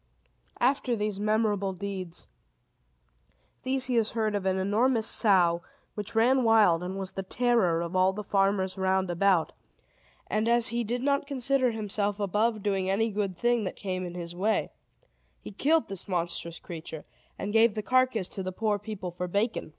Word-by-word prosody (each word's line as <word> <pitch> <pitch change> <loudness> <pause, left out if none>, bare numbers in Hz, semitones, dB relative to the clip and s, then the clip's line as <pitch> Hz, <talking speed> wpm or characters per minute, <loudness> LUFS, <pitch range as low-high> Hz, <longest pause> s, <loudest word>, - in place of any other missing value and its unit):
After 255 -1 +1
these 210 -2 -2
memorable 210 -2 +1
deeds, 185 -2 -6 1.3
Theseus 255 -4 0
heard 220 -2 0
of 200 -2 -1
an 190 0 +1
enormous 220 +5 +1
sow, 180 -7 +3 0.3
which 210 +1 -6
ran 250 +4 +4
wild, 215 -7 +4
and 185 +2 -5
was 190 -1 -5
the 195 - -4
terror 195 -5 +1
of 170 +2 -4
all 185 +1 +4
the 210 +2 -6
farmers 195 -1 0
round 190 -1 +1
about; 175 -1 +2 0.7
and, 215 +2 0
as 235 -1 +2
he 235 +1 -1
did 240 +3 -3
not 280 0 +1
consider 270 -1 +1
himself 210 -2 -2
above 210 +2 0
doing 195 -2 0
any 220 +4 +1
good 200 -3 -2
thing 240 +1 +1
that 185 - -4
came 185 -2 -4
in 175 -1 -6
his 175 -1 -7
way, 210 +5 0 0.7
he - - -9
killed 310 +10 +2
this 195 0 -8
monstrous 170 -2 -3
creature, 160 -2 -8 0.3
and 205 +1 -4
gave 225 -1 +4
the 215 - -3
carcass 255 -4 +2
to 195 - -6
the 185 0 -4
poor 210 +2 -1
people 205 -4 -6
for 180 +1 -4
bacon. 205 +1 -1
205 Hz, 165 wpm, -28 LUFS, 185-230 Hz, 1.3 s, ran